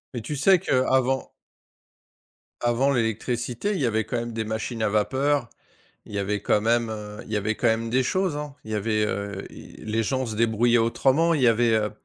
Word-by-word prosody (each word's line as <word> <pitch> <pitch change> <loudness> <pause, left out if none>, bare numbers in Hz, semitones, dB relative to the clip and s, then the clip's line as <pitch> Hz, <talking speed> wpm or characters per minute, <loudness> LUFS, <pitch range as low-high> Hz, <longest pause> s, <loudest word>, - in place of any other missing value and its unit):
Et 120 - -3
tu 150 - -4
sais 185 +6 +5
qu'avant 130 -4 +1 1.3
avant 120 +3 +2
l'électricité, 120 - -1
il 190 - -2
y - - +2
avait 110 -1 0
quand 120 - -3
même 120 0 -3
des 110 -1 -3
machines 110 +2 -4
à 105 - +2
vapeur, 130 +5 +1 0.6
il - - -12
y 100 - -2
avait 100 +1 -1
quand 105 - +2
même, 115 +1 +1
heu 105 -1 -7
il - - -10
y - - +1
avait 105 +2 -1
quand 120 - +1
même 115 +1 0
des 130 +3 +2
choses, 185 +4 0
hein. 150 -1 -6
Il 110 - -7
y - - 0
avait, 105 +1 0
heu 100 -1 -4
i - - -13
les 110 +1 0
gens 130 +3 -1
se 110 - -4
débrouillaient 115 +1 +3
autrement. 135 +8 +2
Il 150 - 0
y 125 - +4
avait, 115 0 +3
heu, 105 -1 0
115 Hz, 215 wpm, -25 LUFS, 110-130 Hz, 1.3 s, sais